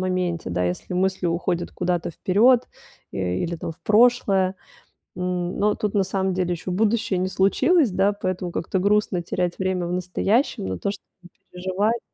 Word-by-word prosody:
моменте, 180 - -1
да. 90 +1 0
Если 90 - -3
мысли 190 0 0
уходят 170 0 -1
куда-то 175 -2 -2
вперёд, 230 +9 +4 0.5
э, - - -6 0.2
или 170 0 -2
там 165 - -5
в - - -23
прошлое. 210 -4 +3 0.6
М, 180 0 -2
но 210 +1 +2
тут 210 -2 -3
на 200 -2 +3
самом 190 0 -1
деле 180 -1 0
еще 175 +2 -5
будущее 210 0 +1
не 185 +1 0
случилось, 215 - +3
да. 195 +2 +2
Поэтому 185 -3 -3
как-то 185 +3 -2
грустно 200 -1 +2
терять 175 0 -2
время 185 -2 -1
в 175 - -3
настоящем 185 - 0
на 95 -1 -3
то, 200 - -1
чтобы 205 - -11 0.5
переживать 190 +6 -1
185 Hz, 170 wpm, -23 LUFS, 180-205 Hz, 0.6 s, вперёд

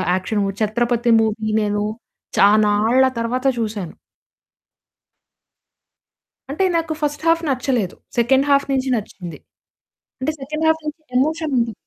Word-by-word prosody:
Action 205 +3 -1
movie. 195 0 -2
'Chhatrapati' 235 +2 +1
movie 220 0 -1
నేను 205 0 -1 0.6
చానాళ్ళ 215 +4 +4 0.2
తరువాత 250 +3 -2
చూసాను. 210 -6 -4 2.6
అంటే 345 +7 -1
నాకు 325 -1 -2
ఫస్ట్ 295 +1 -2
హాఫ్ 330 0 +3
నచ్చలేదు. 250 -7 -1 0.2
సెకండ్ 265 +4 +3
హాఫ్ 280 0 +3
నించి 265 0 0
నచ్చింది. 180 -6 -7 0.8
అంటే 310 +4 -1
సెకండ్ 305 +4 -4
హాఫ్ 320 0 +2
నుంచి 305 +1 -6 0.2
ఎమోషనుంది. 280 -6 0
240 Hz, 110 wpm, -20 LUFS, 215-285 Hz, 2.6 s, చానాళ్ళ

